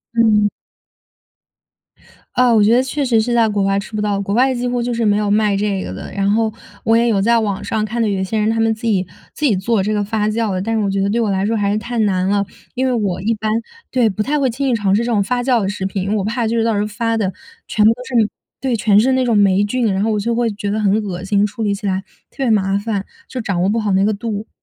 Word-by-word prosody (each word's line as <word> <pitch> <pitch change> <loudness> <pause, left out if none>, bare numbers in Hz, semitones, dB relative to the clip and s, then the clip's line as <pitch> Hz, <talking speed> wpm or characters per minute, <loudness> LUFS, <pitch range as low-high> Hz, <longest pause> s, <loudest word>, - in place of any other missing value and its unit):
嗯。 215 -3 +4 1.9
啊， 250 -1 +4
我 215 -2 +5
觉 220 +3 +4
得 250 - +4
确 285 +2 -2
实 235 -4 +3
是 240 +2 0
在 230 -2 +3
国 205 -1 0
外 195 0 +1
吃 215 +2 -8
不 210 - -1
到。 205 -1 0
国 200 0 -3
外 260 +2 +3
几 245 0 -2
乎 245 -1 -1
就 240 0 -2
是 230 - -1
没 205 -1 +3
有 210 -1 0
卖 210 -2 +2
这 200 -2 -1
个 - - -6
的， 95 - -8
然 195 0 0
后， 220 +1 +1 0.3
我 225 - +3
也 235 +1 +3
有 210 -4 +2
在 235 +2 +3
网 205 -2 -2
上， 220 -1 -1
看 235 +2 -2
到 225 - +2
有 195 -2 -1
些 215 +4 -2
人 215 +1 +1
他 225 0 0
们 225 0 +2
自 220 - -12
己 200 -5 +2 0.3
自 305 - -2
己 220 -8 +3
做 200 +2 0
这 215 +2 -1
个 205 - 0
发 210 +1 -1
酵 220 -1 -1
的。 185 - -2
但 225 +3 -1
是 220 - +1
我 200 - 0
觉 195 0 0
得， 200 - +1
对 230 +3 0
我 215 -3 +1
来 190 +1 0
说 225 +1 0
还 200 -1 +1
是 210 - 0
太 235 +3 -4
难 190 -3 +1
了。 200 0 +1 0.3
因 260 +1 0
为 255 - +1
我 200 -6 -1
一 225 +3 +1
般 215 0 -2 0.4
对， 245 -3 +2
不 205 +2 -3
太 295 +6 0
会 265 -2 +2
轻 265 +3 -2
易 245 - +2
尝 200 -3 +1
试 230 - +1
这 240 - -2
种 205 -3 +2
发 245 +4 -1
酵 245 -1 +2
的 195 - -1
食 195 -2 -4
品。 195 0 -2
因 195 - -3
为 - - +1
我 200 - 0
怕 230 +2 -1
就 230 - -1
是 225 - +2
到 225 -1 +1
时 - - 0
候 210 - 0
发 225 +2 -1
的， 195 -3 -1 0.3
全 210 - +1
部 220 - +7
都 250 - -10
是 255 - -6
那 225 -3 +4 0.3
对， 260 -3 0
全 210 -1 +4
是 260 +4 +3
那 260 0 +2
种 235 -3 +2
霉 200 -1 +4
菌， 225 +1 0
然 190 +1 0
后 220 - +1
我 210 - 0
就 230 +3 -1
会 235 -1 +1
觉 205 0 -4
得 215 - -1
很 205 -2 +2
恶 185 -2 -5
心， 200 +1 +2
处 210 +2 -4
理 205 -1 +1
起 200 0 -4
来 190 0 0 0.3
特 - - -29
别 245 - +1
麻 195 -2 +2
烦， 205 -1 -2 0.2
就 255 - -5
掌 195 -5 -1
握 185 - +2
不 230 - +1
好 215 -2 -1
那 195 +1 +3
个 215 - +1
度。 210 0 -4
215 Hz, 325 characters per minute, -18 LUFS, 200-230 Hz, 1.9 s, 部